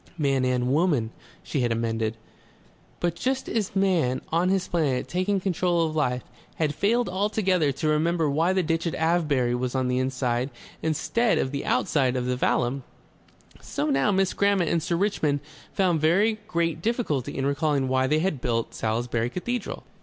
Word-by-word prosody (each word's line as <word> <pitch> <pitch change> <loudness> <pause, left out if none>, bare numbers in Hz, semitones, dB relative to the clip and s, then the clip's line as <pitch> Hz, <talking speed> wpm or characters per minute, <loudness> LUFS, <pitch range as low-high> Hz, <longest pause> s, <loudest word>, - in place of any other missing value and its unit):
"Man 135 -4 +1
and 125 0 +1
woman," 145 -9 +2 0.3
she 145 - -2
had 120 -2 +1
amended. 115 -1 -1 0.8
But 175 -1 0
just 260 +6 -1
as 215 -3 -2
man 180 -10 +2
on 170 +3 +2
his 190 -1 +1
planet 145 -7 0
taking 185 +2 0
control 180 -2 +1
of 155 -1 -3
life 125 -5 0 0.3
had 155 -2 0
failed 225 +10 +1
altogether 185 -4 +1
to 140 +4 -2
remember 160 +1 +2
why 160 +5 +2
the 190 -1 +1
ditch 165 +1 0
at 165 - -2
Avebury 155 -7 +1
was 125 +1 -2
on 130 -1 0
the 125 0 +1
inside 130 -1 -1 0.3
instead 220 +9 +1
of 130 - 0
the 140 -1 -3
outside 130 0 +1
of 125 -1 -1
the 125 0 0
vallum, 125 +1 0 0.8
so 150 +1 -2
now 135 +7 +2
Miss 190 -1 +1
Grammont 200 -4 +2
and 170 - +1
Sir 170 +2 -1
Richmond 165 -6 +1 0.3
found 180 -5 +1
very 205 +8 +3
great 165 -3 -1
difficulty 215 - -1
in 135 - -1
recalling 140 -1 +1
why 130 0 +2
they 150 +3 +2
had 160 -8 -1
built 115 -2 -1
Salisbury 115 +1 -1
Cathedral. 235 - -4
155 Hz, 170 wpm, -25 LUFS, 130-180 Hz, 0.8 s, very